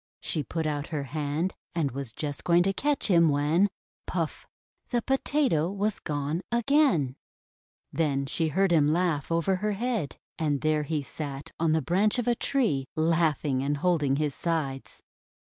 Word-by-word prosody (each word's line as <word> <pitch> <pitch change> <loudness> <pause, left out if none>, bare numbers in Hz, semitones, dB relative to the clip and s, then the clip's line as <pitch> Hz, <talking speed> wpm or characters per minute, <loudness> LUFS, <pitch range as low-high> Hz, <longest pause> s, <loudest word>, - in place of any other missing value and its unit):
She 155 - -1
put 160 +4 -3
out 145 -1 -2
her 150 -4 -3
hand, 150 +5 -2 0.2
and 155 -5 0
was 135 -2 -3
just 145 +3 -5
going 175 0 +4
to 195 +1 +1
catch 290 +7 0
him, 170 -5 +5
when 150 +7 +3 0.2
— - - -59
puff! - - -3 0.4
the 240 -2 0
Potato 270 - +1
was 205 +1 -1
gone 150 +3 -2
again! 235 - +3 0.8
Then 140 -4 +1
she 160 +4 -1
heard 190 +5 +2
him 150 -3 +4
laugh 165 -3 0
over 170 +3 +1
her 210 +2 -1
head. 225 - -2 0.2
And 150 -3 0
there 155 -1 +2
he 150 -1 -1
sat 140 -1 -6
on 160 -1 +2
the 160 - +1
branch 200 +6 +2
of 245 - -1
a 240 - +4
tree, 220 - 0
laughing 155 -4 +1
and 145 +2 0
holding 150 -4 +2
his 150 -1 0
sides. 150 -6 -3
160 Hz, 165 wpm, -27 LUFS, 145-190 Hz, 0.8 s, him